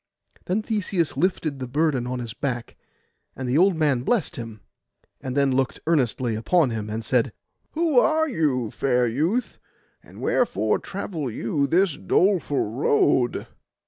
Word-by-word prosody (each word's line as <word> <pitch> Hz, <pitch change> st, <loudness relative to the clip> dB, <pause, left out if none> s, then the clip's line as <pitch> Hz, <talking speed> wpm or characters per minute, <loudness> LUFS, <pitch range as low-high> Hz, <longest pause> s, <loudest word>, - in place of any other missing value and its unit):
Then 200 Hz, +4 st, -1 dB
Theseus 200 Hz, -7 st, -1 dB
lifted 160 Hz, -6 st, -1 dB
the 130 Hz, -, -4 dB
burden 140 Hz, -2 st, 0 dB
on 125 Hz, 0 st, -3 dB
his 120 Hz, -3 st, -5 dB
back. 120 Hz, -3 st, -4 dB, 0.6 s
And 130 Hz, -, -5 dB
the 130 Hz, +5 st, +2 dB
old 190 Hz, 0 st, +4 dB
man 145 Hz, -6 st, +1 dB
blest 175 Hz, -, 0 dB
him, 115 Hz, -5 st, -8 dB, 0.6 s
and 130 Hz, +1 st, -4 dB
then 140 Hz, -1 st, +3 dB
looked 130 Hz, -1 st, 0 dB
earnestly 130 Hz, -6 st, +1 dB
upon 130 Hz, +6 st, +2 dB
him, 110 Hz, -2 st, -4 dB
and 110 Hz, +1 st, -4 dB
said— 125 Hz, -2 st, +1 dB, 0.4 s
'Who 315 Hz, -5 st, +3 dB
are 315 Hz, +4 st, +2 dB
you, 145 Hz, -, 0 dB
fair 125 Hz, -2 st, +1 dB
youth, 160 Hz, -, -1 dB, 0.4 s
and -, -, -15 dB
wherefore 110 Hz, -, +1 dB
travel 170 Hz, -8 st, -5 dB
you 130 Hz, +6 st, -1 dB
this 175 Hz, +1 st, +2 dB
doleful 160 Hz, -, +1 dB
road? 125 Hz, +1 st, +1 dB
140 Hz, 145 wpm, -24 LUFS, 120-175 Hz, 0.6 s, old